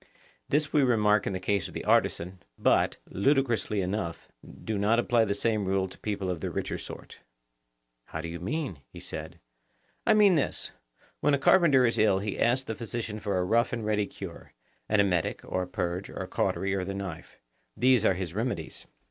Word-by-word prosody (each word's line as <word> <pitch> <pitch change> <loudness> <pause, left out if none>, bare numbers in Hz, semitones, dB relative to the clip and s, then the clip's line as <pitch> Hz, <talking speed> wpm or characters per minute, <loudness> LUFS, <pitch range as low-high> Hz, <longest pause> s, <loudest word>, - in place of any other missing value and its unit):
This 150 +1 +1
we 150 - +5
remark 105 -5 +3
in - - -1
the 95 - -2
case 100 0 0
of - - -13
the - - -5
artisan, 90 +2 +1 0.2
but, - - +2
ludicrously 120 -3 +1
enough, 90 -2 -3 0.3
do 110 -2 -2
not 105 +3 +3
apply 120 -1 +3
the 100 -1 -1
same 110 -1 0
rule 95 0 +1
to 95 - -13
people 100 -3 -2
of 85 -3 -5
the - - -2
richer - - -3
sort. - - -10 0.9
How 80 - -6
do 80 - -4
you 85 0 -6
mean? 130 - -3
he - - -10
said. 80 +2 -7 0.7
I - - +6
mean 205 -3 +6
this: 150 -5 -1 0.5
When 145 - +3
a - - 0
carpenter 140 -3 +5
is 115 - +1
ill 105 -3 +4
he 100 +1 -3
asks 125 +3 +2
the 115 - -4
physician 115 -1 -4
for 100 -2 -1
a 90 - +1
rough 115 +5 +2
and 115 -3 -3
ready 105 -1 +1
cure; - - -9 0.4
an 105 - +3
emetic 90 -5 +1
or 95 - -2
a 90 - -3
purge 90 -1 -3
or - - -11
a - - -7
cautery 100 0 0
or 95 -1 -1
the 95 +1 -4
knife,—these 90 - -2
are 95 - +3
his 90 -2 -4
remedies. 110 -6 -4
105 Hz, 195 wpm, -28 LUFS, 95-120 Hz, 0.9 s, I